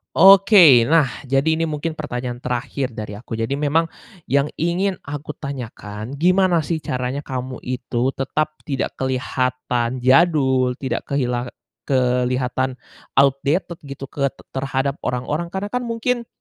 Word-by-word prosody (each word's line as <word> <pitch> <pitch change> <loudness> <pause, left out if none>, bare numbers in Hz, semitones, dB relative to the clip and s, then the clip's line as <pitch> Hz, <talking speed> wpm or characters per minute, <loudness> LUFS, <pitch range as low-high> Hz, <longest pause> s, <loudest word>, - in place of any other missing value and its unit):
Oke. 190 - +8
Nah, 160 -4 +5 0.2
jadi 140 +4 +2
ini 165 - -1
mungkin 155 0 -3
pertanyaan 125 -5 -5
terakhir 125 +2 -2
dari 105 -2 -6
aku. 110 +4 -14
Jadi 115 +5 -1
memang 150 +3 +1 0.4
yang 140 +2 +1
ingin 180 +3 0
aku 145 +1 -5
tanyakan, 120 -6 -7
gimana 180 0 +4
sih 160 -2 -2
caranya 125 +3 -3
kamu 130 -1 -5
itu 125 0 -1
tetap 155 +3 -2
tidak 135 -3 -1
kelihatan 130 -1 -1
jadul, 130 -3 +4
tidak 130 +1 -4
kehilang 125 -3 -1 0.4
kelihatan 125 0 +1 0.4
outdated 140 +6 +2
gitu 140 0 -8
ke 140 -1 0
t - - -28
terhadap 135 +1 -2
orang-orang? 130 +7 -2
Karena 190 +3 -5
kan 250 0 -1
mungkin, 235 +1 -1
135 Hz, 130 wpm, -21 LUFS, 125-160 Hz, 0.4 s, Oke